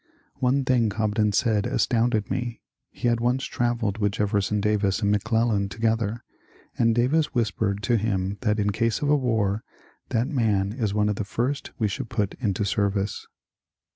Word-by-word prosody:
One 130 +1 +2
thing 120 -4 +3
Cobden 105 0 +1
said 105 -1 +1
astounded 115 -3 +1
me. 120 -2 -3 0.3
He - - -3
had 120 -1 +2
once 125 +3 0
travelled 120 -4 -1
with 105 -1 +1
Jefferson 105 -1 0
Davis 105 0 +1
and 100 - +3
McClellan 105 -1 +1
together, 115 +1 -1 0.5
and 115 -1 +2
Davis 145 +6 +1
whispered 105 -3 0
to 120 0 +2
him 100 -2 -1
that 105 -4 +1
in 105 -1 +1
case 115 +6 0
of 145 - +1
a - - +6
war 110 -6 0 0.4
^^ - - -39
that 115 +2 +1
man 105 -8 +1
is 110 -5 -1
one 105 0 +1
of 105 -2 -1
the - - -1
first 120 +7 -2
we 110 - +1
should 120 +4 -4
put 100 -2 -1
into 105 -3 0
service." 100 -1 -1
110 Hz, 170 wpm, -25 LUFS, 100-120 Hz, 0.5 s, a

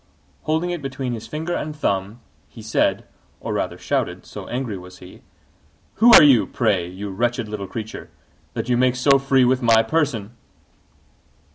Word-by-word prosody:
Holding 160 +3 0
it 175 -3 -4
between 135 -2 -4
his 115 -1 -7
finger 160 +3 -4
and 155 -2 -4
thumb, 100 -4 -2 0.3
he 115 - -12
said 110 - 0 0.3
or - - -4
rather - - -2
shouted, - - -2
so - - -9
angry 120 -4 -3
was 90 0 -11
he 90 0 -14 0.8
"Who 235 +2 +6
are - - +10
you, 135 -7 +5
pray, 100 -8 0
you 100 +2 -7
wretched 120 +3 -1
little 105 -2 -6
creature, 110 +3 -7 0.5
that - - -3
you 125 -1 +1
make 125 0 +2
so 135 +2 +4
free 135 -1 +3
with 130 +1 +2
my 115 -2 +4
person?" 120 -5 -1
120 Hz, 165 wpm, -21 LUFS, 105-135 Hz, 0.8 s, are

